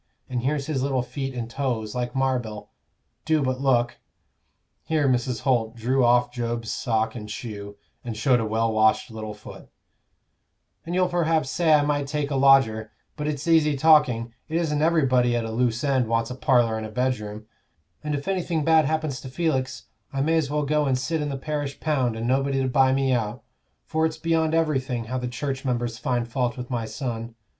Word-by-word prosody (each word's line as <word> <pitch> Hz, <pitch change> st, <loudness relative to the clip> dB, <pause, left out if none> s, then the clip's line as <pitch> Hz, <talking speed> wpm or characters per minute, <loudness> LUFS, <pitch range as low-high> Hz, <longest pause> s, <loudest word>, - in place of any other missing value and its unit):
And 125 Hz, -2 st, -2 dB
here's 140 Hz, +2 st, -1 dB
his 145 Hz, -4 st, -2 dB
little 130 Hz, -2 st, 0 dB
feet 135 Hz, 0 st, -5 dB
and 120 Hz, -2 st, -3 dB
toes, 120 Hz, -4 st, -3 dB
like 125 Hz, 0 st, -3 dB
marbil; 125 Hz, -6 st, -2 dB, 0.5 s
do 155 Hz, -2 st, +2 dB
but 130 Hz, 0 st, -1 dB
look" 120 Hz, -3 st, +2 dB, 0.9 s
here 155 Hz, -3 st, +1 dB
Mrs. 125 Hz, -3 st, 0 dB
Holt 120 Hz, -4 st, +1 dB
drew 125 Hz, +3 st, +1 dB
off 120 Hz, 0 st, +4 dB
Job's 120 Hz, -2 st, -3 dB
sock 110 Hz, -2 st, 0 dB
and 105 Hz, -3 st, -8 dB
shoe, 105 Hz, -2 st, -7 dB, 0.3 s
and 115 Hz, -3 st, -5 dB
showed 125 Hz, +2 st, +3 dB
a 115 Hz, -, -1 dB
well 110 Hz, +1 st, 0 dB
washed 110 Hz, +1 st, +2 dB
little 110 Hz, -1 st, -6 dB
foot 105 Hz, -, -12 dB, 1.2 s
"and 175 Hz, -, -2 dB
you'll 185 Hz, 0 st, +3 dB
perhaps 165 Hz, -5 st, +1 dB
say 170 Hz, -2 st, +2 dB
I 145 Hz, -, +3 dB
might 145 Hz, -1 st, 0 dB
take 145 Hz, 0 st, -2 dB
a -, -, 0 dB
lodger; 130 Hz, -5 st, +4 dB, 0.2 s
but 150 Hz, -1 st, -3 dB
it's 150 Hz, +1 st, -3 dB
easy 155 Hz, -3 st, +4 dB
talking; 130 Hz, -7 st, +4 dB, 0.2 s
it 160 Hz, -, 0 dB
isn't 150 Hz, -3 st, 0 dB
everybody 130 Hz, -7 st, +3 dB
at 115 Hz, -1 st, -1 dB
a 115 Hz, -, -4 dB
loose 120 Hz, +2 st, 0 dB
end 135 Hz, -4 st, +2 dB
wants 115 Hz, +1 st, 0 dB
a -, -, -4 dB
parlor 120 Hz, -4 st, +2 dB
and 110 Hz, -, -4 dB
a -, -, -10 dB
bedroom; 110 Hz, -3 st, -2 dB, 0.6 s
and 150 Hz, -1 st, -1 dB
if 140 Hz, 0 st, -5 dB
anything 175 Hz, -4 st, 0 dB
bad 160 Hz, -1 st, +5 dB
happens 155 Hz, -3 st, -1 dB
to 130 Hz, -, -8 dB
Felix, 130 Hz, -3 st, -1 dB, 0.3 s
I 135 Hz, -, -2 dB
may 160 Hz, +3 st, +2 dB
as 155 Hz, -4 st, +1 dB
well 150 Hz, 0 st, 0 dB
go 150 Hz, 0 st, +1 dB
and 130 Hz, -1 st, +2 dB
sit 160 Hz, +5 st, -2 dB
in 145 Hz, -, -2 dB
the 135 Hz, -, -3 dB
parish 145 Hz, 0 st, -4 dB
pound, 130 Hz, -7 st, 0 dB
and 115 Hz, +1 st, -4 dB
nobody 135 Hz, +1 st, +1 dB
to -, -, 0 dB
buy 130 Hz, 0 st, +4 dB
me 135 Hz, 0 st, +1 dB
out; 110 Hz, -4 st, -2 dB, 0.4 s
for 160 Hz, 0 st, +1 dB
it's 160 Hz, -, -7 dB
beyond 165 Hz, -1 st, +1 dB
everything 135 Hz, -7 st, 0 dB
how 125 Hz, +3 st, -3 dB
the 125 Hz, -, -3 dB
church 130 Hz, +2 st, -4 dB
members 120 Hz, -3 st, -2 dB
find 120 Hz, -4 st, -1 dB
fault 120 Hz, 0 st, -1 dB
with 125 Hz, +1 st, -7 dB
my 120 Hz, -2 st, -1 dB
son. 115 Hz, -2 st, -5 dB
130 Hz, 200 wpm, -25 LUFS, 120-150 Hz, 1.2 s, bad